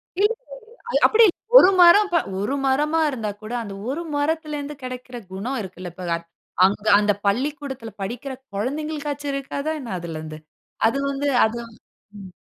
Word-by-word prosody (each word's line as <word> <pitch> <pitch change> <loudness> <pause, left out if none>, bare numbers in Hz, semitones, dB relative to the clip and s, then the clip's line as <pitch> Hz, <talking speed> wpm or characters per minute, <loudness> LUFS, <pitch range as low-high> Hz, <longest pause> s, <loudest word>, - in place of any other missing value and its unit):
இல்லல்ல. 465 +6 -1 0.3
அது - - +2
அப்டி 460 +1 +5
இல்ல. - - +2 0.3
ஒரு 375 - +7
மரம் 385 +4 +7
ப, - - +4 0.2
ஒரு 210 +7 -1
மரமா 300 +4 +2
இருந்தா 225 -6 -3
கூட, 215 +2 -7
அந்த 200 -3 -7
ஒரு 290 +6 -2
மரத்திலருந்து 295 -1 -2
கெடைக்கிற 255 0 -7 0.2
குணம் 230 +8 -3
இருக்குல்ல, 185 -1 -8
இப்ப 185 -1 -7 0.6
அங்க 205 +2 +1
அந்த 205 0 +3
பள்ளிக்கூடத்தில 265 +2 -2
படிக்கிற 245 +7 -5 0.2
கொழந்தைகளுக்காச்சும் 290 +4 -3
இருக்காதா 280 +2 -3
என்ன 240 -7 -6
அதிலருந்து? 155 -2 -7 0.5
அது 230 +5 +1
வந்து 280 +1 -1 0.2
அது. 220 +2 -1 0.6
ம். 195 -2 -9
270 Hz, 145 wpm, -23 LUFS, 215-300 Hz, 0.6 s, ஒரு